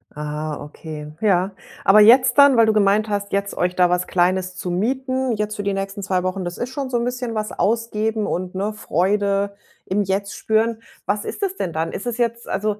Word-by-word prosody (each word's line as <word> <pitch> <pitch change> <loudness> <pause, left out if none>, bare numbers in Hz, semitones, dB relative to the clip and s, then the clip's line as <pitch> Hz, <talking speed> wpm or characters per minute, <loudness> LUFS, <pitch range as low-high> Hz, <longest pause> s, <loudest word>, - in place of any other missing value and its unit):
Ah, 150 0 -4
okay, 150 0 -8
ja. 195 -2 +2 0.3
Aber 200 +2 +6
jetzt 245 +3 +6
dann, 280 -2 +7
weil 230 -1 +6
du 220 - +3
gemeint 210 +1 +3
hast, 200 -1 -3
jetzt 200 0 -1
euch 180 0 0
da 180 -1 +4
was 180 0 0
Kleines 185 +1 +1
zu 180 -1 -4
mieten, 260 +6 -1
jetzt 210 0 -2
für 205 - -3
die 200 0 0
nächsten 195 +1 -4
2 185 -2 0
Wochen, 185 0 -2
das 175 0 -5
ist 240 - -3
schon 265 0 -4
so 245 - 0
'n 235 - -1
bisschen 245 -1 -3
was 215 0 -2
ausgeben 220 0 0
und, 185 0 -3
ne, 200 +3 -1
Freude 200 +1 0 0.3
im 200 +2 0
Jetzt 200 +1 -2
spüren. 220 +1 +1 0.3
Was 205 +1 -1
ist - - -6
das 390 -1 -1
denn 170 - -3
dann? 160 +1 -2
Ist 220 - -5
es 240 -1 -2
jetzt 235 -1 -1
also, 210 +2 -1
205 Hz, 215 wpm, -21 LUFS, 185-230 Hz, 0.3 s, dann